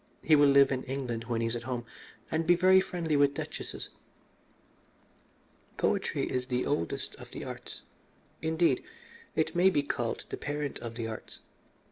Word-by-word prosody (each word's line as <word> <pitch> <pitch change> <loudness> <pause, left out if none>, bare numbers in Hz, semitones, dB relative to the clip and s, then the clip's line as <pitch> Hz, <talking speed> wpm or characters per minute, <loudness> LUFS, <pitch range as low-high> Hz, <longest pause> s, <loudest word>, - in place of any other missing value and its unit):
He 155 - +6
will 145 -1 +6
live 140 0 +6
in 130 -1 0
England 125 -4 -3
when 115 -1 -1
he 115 - +1
is 115 - -1
at 120 - -3
home, 120 -2 -2 0.5
and 160 0 0
be 175 - +7
very 185 +2 +6
friendly 170 -4 -1
with 140 -1 +4
duchesses. - - -5 1.9
"Poetry - - 0
is 125 0 -2
the 125 -1 0
oldest 115 - -1
of - - -11
the - - -7
arts. - - -8 0.6
Indeed, 160 -4 +2 0.5
it 160 +2 0
may 180 +2 +6
be 145 -6 +1
called 120 -4 -2
the - - -4
parent 145 -1 -3
of 115 -1 -6
the 115 -1 -3
arts. 110 -1 -7
140 Hz, 165 wpm, -30 LUFS, 120-160 Hz, 1.9 s, be